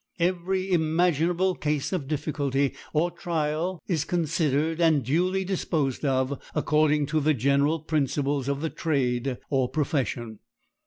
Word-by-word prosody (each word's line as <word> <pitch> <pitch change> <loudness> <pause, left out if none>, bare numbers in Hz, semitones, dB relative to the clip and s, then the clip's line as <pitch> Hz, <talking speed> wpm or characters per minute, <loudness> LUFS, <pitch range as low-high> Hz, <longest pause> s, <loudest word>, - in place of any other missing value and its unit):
Every 185 +2 0
imaginable 175 +2 +2
case 150 0 -2
of 160 -8 -2
difficulty 140 -2 -1 0.2
or 165 +3 +1
trial 165 +1 -2
is 160 -6 0
considered 160 -1 0
and 155 -6 +3
duly 180 +8 +1
disposed 160 -8 -1
of 130 -1 0
according 150 -1 +2
to 155 +2 0
the 155 +1 +2
general 140 +5 +2
principles 140 -3 0
of 140 0 -1
the 160 - -2
trade 130 -4 -1
or 130 -3 +2
profession. 125 -7 -2
150 Hz, 125 wpm, -26 LUFS, 140-170 Hz, 0.2 s, and